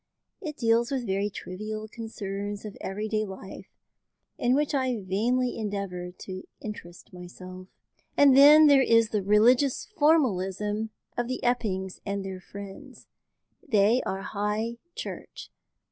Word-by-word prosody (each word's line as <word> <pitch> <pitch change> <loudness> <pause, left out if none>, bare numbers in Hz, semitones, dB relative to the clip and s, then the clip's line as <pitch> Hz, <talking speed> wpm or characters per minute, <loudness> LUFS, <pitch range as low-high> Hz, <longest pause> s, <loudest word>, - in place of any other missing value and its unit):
It 310 -5 -6
deals 230 0 +2
with 265 -3 -2
very 200 0 0
trivial 215 +3 -6
concerns 205 -2 -6
of 210 - -7
everyday 215 +2 -2
life, 195 -1 -9 0.7
in 245 +1 +3
which 295 +1 0
I 260 -4 0
vainly 235 +7 0
endeavour 200 -4 -4
to 185 +1 -8 0.2
interest 175 -6 -9
myself. 185 +1 -10 0.5
"Then 285 +2 +8
there 285 -2 +7
is 230 -3 +4
the 210 -2 0
religious 240 +7 +3
formalism 220 - +1 0.3
of 240 0 -1
the 255 - -3
Eppings 200 -7 -1
and 200 -1 -3
their 190 -1 -6
friends. 195 +1 -11 0.6
They 225 -1 +3
are 195 0 -4
High 215 +4 -2 0.2
Church. - - -8
215 Hz, 125 wpm, -27 LUFS, 195-245 Hz, 0.7 s, Then